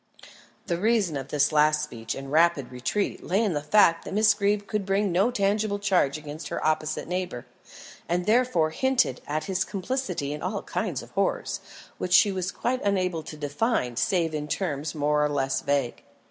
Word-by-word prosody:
The 170 -4 -2
reason 210 -6 +2
of 135 -1 -4
this 145 +1 +2
last 150 0 +3
speech 115 -6 -5
and 135 0 -7
rapid 155 -5 +3
retreat 125 +11 -2
lay 195 +5 +1
in 205 -5 0
the 145 - -1
fact 165 +1 +4
that - - -6
Miss 215 0 +5
Greeb 205 0 0
could 210 -1 -2
bring 195 0 +1
no 190 +7 +3
tangible 205 -1 0
charge 185 -8 +1
against 150 +1 -8
her - - -4
opposite 155 -1 0
neighbour; 180 -8 -3 0.6
and 175 +1 0
therefore 215 -9 +2
hinted 260 - +1
at 155 +1 -2
his 190 -1 0
complicity 185 - -3
in 150 - -6
all 195 +3 -3
kinds - - -3
of - - -14
horrors, - - -1 0.4
which 180 - -2
she 200 +3 +6
was 190 0 -2
quite 255 +1 -2
unable 185 -4 0
to 155 0 -9
define 145 - -1
save 165 +4 +1
in 150 -1 -3
terms 150 -3 -2
more 150 0 +2
or 150 - +1
less 135 -2 0
vague. 140 -4 -1
170 Hz, 185 wpm, -26 LUFS, 150-200 Hz, 0.6 s, she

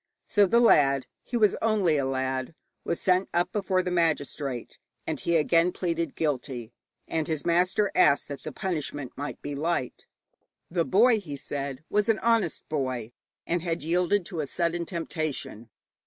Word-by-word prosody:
So 205 -1 +4
the 235 +6 +4
lad 140 - +5 0.2
he 240 - -2
was 210 -4 +4
only 205 -8 +2
a 140 - 0
lad 130 +2 -2 0.3
was 170 - -2
sent 185 0 +2
up 175 0 +2
before 190 -3 0
the 180 - -2
magistrate, 145 -6 -1 0.3
and - - -3
he 170 - 0
again 165 +2 +3
pleaded 170 -4 -2
guilty, 130 -6 -2 0.3
and 160 -2 -1
his 155 -3 -2
master 180 +4 +2
asked 145 -5 +4
that 140 - -6
the - - -6
punishment 145 -7 -3
might 145 +2 -5
be 145 - -4
light. 150 -2 -2 0.6
The 170 -2 +1
boy, 225 +3 +5
he 155 -8 -7
said, 140 0 -5
was 210 +2 +1
an 220 - +4
honest 225 -8 +1
boy, 130 -6 -2 0.3
and 175 0 0
had 165 -3 -2
yielded 180 +3 +1
to 170 -3 -5
a 150 - -1
sudden 170 +3 -1
temptation. 155 - -4
165 Hz, 165 wpm, -27 LUFS, 140-185 Hz, 0.6 s, lad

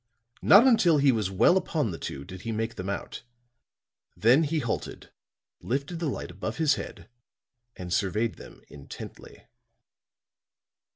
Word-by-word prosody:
Not 205 +6 +7
until 195 - +5
he 140 -1 +4
was 110 -5 -1
well 100 - +4
upon 155 - -1
the 80 - -7
two 70 0 -6
did 95 0 -10
he 115 - -4
make 110 +1 -2
them 95 +1 -6
out; 100 - -5 1.0
then 125 +9 +4
he 160 +2 -1
halted, 120 -7 -4 0.5
lifted 140 +7 -3
the 165 -3 -1
light 110 - -5
above 105 +5 -5
his 155 -3 +3
head - - -7 0.7
and 90 -1 -6
surveyed 105 +4 0
them - - -14
intently. 70 -1 -11
115 Hz, 140 wpm, -27 LUFS, 95-155 Hz, 1.0 s, Not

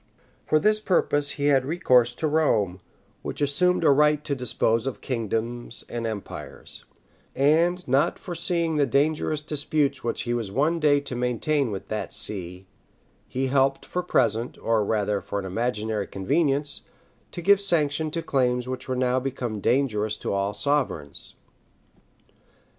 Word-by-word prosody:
For 155 - +4
this 215 +5 +3
purpose 145 -7 +2
he 145 - -1
had 135 -3 +4
recourse 130 -6 +3
to 155 - -1
Rome, 110 - +1 0.4
which - - -6
assumed 170 +6 +2
a 150 - +6
right 150 +1 +3
to 145 - -1
dispose 120 -2 0
of 135 - -4
kingdoms 115 0 -3
and 115 -1 -3
empires; 110 -3 -7 0.5
and 170 +6 +2
not 135 +3 +2
foreseeing 170 -2 -1
the 145 -2 +3
dangerous 150 +1 +1
disputes 145 -2 0
which 115 - -2
he 120 - -1
was 115 -5 -3
one 150 +9 +1
day 145 -2 +4
to 140 -3 -5
maintain 125 +3 0
with 100 -3 -6
that 110 -1 -3
see, 90 -2 -4 0.6
he 130 +1 -2
helped, 135 0 +1
for 180 - -2
present, 115 -9 0
or 115 -2 +1
rather 105 -1 0
for 100 - -5
an 100 - -3
imaginary 110 0 -2
convenience, 145 - 0 0.5
to 175 - -6
give 200 +2 +5
sanction 155 -5 +1
to 165 +2 -3
claims 125 -2 +1
which 130 0 -5
were 130 - 0
now 125 0 +1
become 125 -4 -4
dangerous 110 -4 +1
to - - -3
all 100 +1 0
sovereigns. 105 - -2
135 Hz, 150 wpm, -25 LUFS, 115-150 Hz, 0.6 s, a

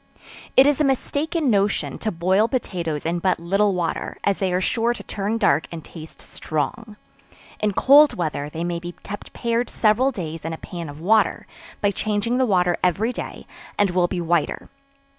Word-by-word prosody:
It 265 - +9
is 290 0 +3
a - - +5
mistaken 285 +2 0
notion, 195 -9 0
to 215 - -2
boil 190 +5 +2
potatoes 170 - -3
in 170 +1 0
but 185 0 +1
little 195 +3 +1
water, 170 -2 -3
as 200 -1 +1
they 190 -2 0
are 180 - +1
sure 230 +5 0
to - - -9
turn 205 +3 -2
dark 195 -9 +2
and 165 -2 -8
taste 160 -2 -11
strong. 215 - -4 0.6
In 210 -1 0
cold 285 +8 +6
weather 150 -4 -3
they 160 +2 -5
may 175 -1 -2
be 175 0 -8
kept 205 0 -8
pared 235 0 -1
several 225 +5 +2
days 165 - -6
in 165 +1 -3
a - - -5
pan 170 -2 -7
of 145 +1 -10
water, 215 +6 +2 0.4
by 205 - +2
changing 215 +4 -1
the 260 - +3
water 180 -3 +2
every 195 +7 +1
day, - - -7 0.3
and 205 -2 +2
will 180 -1 +2
be 180 0 -3
whiter. 170 -1 -1
195 Hz, 185 wpm, -22 LUFS, 170-225 Hz, 0.6 s, It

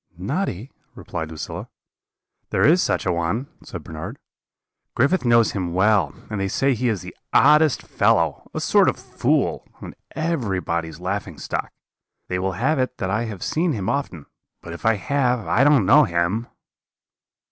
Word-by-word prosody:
"'Noddy?' 110 - -3 0.2
replied 80 -1 -5
Lucilla. 80 -1 -7 0.8
"'There - - +2
is 170 +5 +5
such - - 0
a 90 - +2
one,' 85 +9 -1 0.2
said 90 -4 -8
Bernard; 85 - -7 0.8
'Griffith 140 +5 +2
knows 115 -2 +4
him 90 -4 -3
well, 105 +1 +3 0.2
and 105 -2 -2
they 95 - 0
say 135 +7 +1
he 125 +1 0
is 100 -7 -2
the - - -10 0.2
oddest 150 -2 +5
fellow - - +1
a - - -4
sort - - +4
of - - -3
fool, - - -1
and - - -9 0.2
everybody's 95 - -2
laughing 95 +3 -4
stock. - - -4 0.6
They 90 - -1
will 95 +1 -1
have 135 - 0
it 130 0 -1
that 95 0 -2
I 110 +4 0
have 105 -5 -6
seen 165 0 0
him 100 -5 -2
often; 95 - -3 0.4
but 85 - -7
if 85 +7 -4
I 115 - +4
have, 125 +1 0
I 125 - +3
don't 140 -7 +5
know 95 - +6
him.' 85 +7 -1
105 Hz, 165 wpm, -22 LUFS, 90-130 Hz, 0.8 s, know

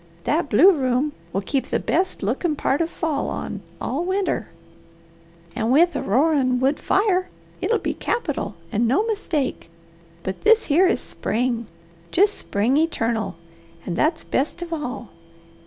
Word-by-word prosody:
That 305 0 0
blue 315 - +7
room 265 -2 +1 0.2
will 195 - -1
keep 270 +6 -1
the - - 0
best 370 - -1
lookin' 280 - 0
part 285 +1 0
of 330 - 0
fall 315 -4 -2
on - - -5 0.2
all 290 +6 -2
winter, 375 - -1 1.1
and 230 -1 0
with 340 +6 +4
a - - -1
roarin' 260 +1 +2
wood 270 +3 +1
fire, 380 -2 +1 0.3
it'll 460 - +2
be - - -2
capital, 290 - -2 0.2
and 230 +3 +1
no 380 - +2
mistake; 330 - -2 0.5
but 190 - -4
this 445 +1 +5
here 340 +6 +4
is - - +1
spring, 235 -1 -2 0.4
jest 405 +3 +4
spring 230 - 0
eternal, 230 - 0 0.5
an' 175 - -3
that's 315 - +1
best 310 +6 -1
of 340 -1 -6
all. 255 -7 -4
290 Hz, 150 wpm, -23 LUFS, 245-350 Hz, 1.1 s, blue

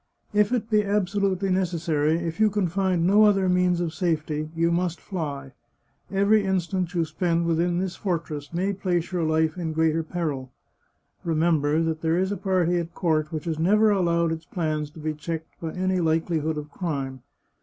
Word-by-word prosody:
If 210 +1 +3
it 240 -3 0
be 210 -1 +4
absolutely 200 -1 0
necessary, 165 -4 +1
if 170 +1 -4
you 215 -1 +5
can 205 -2 0
find 180 -1 +1
no 205 +4 +6
other 195 -2 +3
means 180 -1 +2
of 170 -2 -2
safety, 155 -4 -1
you 165 +1 +2
must 175 0 0
fly. 145 -8 -5 0.6
Every 200 +2 +3
instant 185 -1 -1
you 170 -2 +2
spend 170 +1 0
within 170 +1 +1
this 185 0 -2
fortress 160 -6 -3
may 185 +4 0
place 180 -3 -1
your 180 -2 -1
life 160 +1 +1
in 160 -2 -2
greater 160 0 +2
peril. 155 -6 -4 0.7
Remember 160 -2 +2
that 160 -1 -2
there 165 +1 +1
is 190 +2 +1
a - - 0
party 180 -2 +1
at 170 0 -6
court 155 -3 0
which 160 +1 -4
has 160 -2 -2
never 210 +6 +4
allowed 170 -4 +2
its 160 0 -4
plans 155 -4 -2
to 155 - -13
be 155 0 -2
checked 160 +1 -6
by 165 -1 -3
any 185 0 0
likelihood 160 -1 0
of 150 0 -6
crime. 140 -7 -4
170 Hz, 180 wpm, -25 LUFS, 160-185 Hz, 0.7 s, no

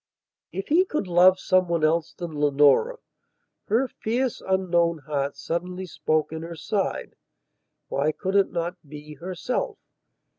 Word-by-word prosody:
If 195 +3 -5
he 335 +5 +5
could 305 - -2
love 180 +1 +5
some 185 -1 +2
one 170 -2 0
else 165 +1 +1
than 170 -3 -6
Leonora, 145 - +3 0.7
her 235 +6 +2
fierce 245 +2 -2
unknown 175 -3 +1
heart 140 -1 -2
suddenly 180 +5 -3
spoke 155 -1 -1
in 160 0 -5
her 165 +1 -7
side, 195 +4 -2 0.7
why 145 +3 0
could 190 +4 -4
it 200 -1 +3
not 175 +1 -3
be 150 +1 -9
herself? 185 - -3
175 Hz, 140 wpm, -25 LUFS, 155-190 Hz, 0.7 s, he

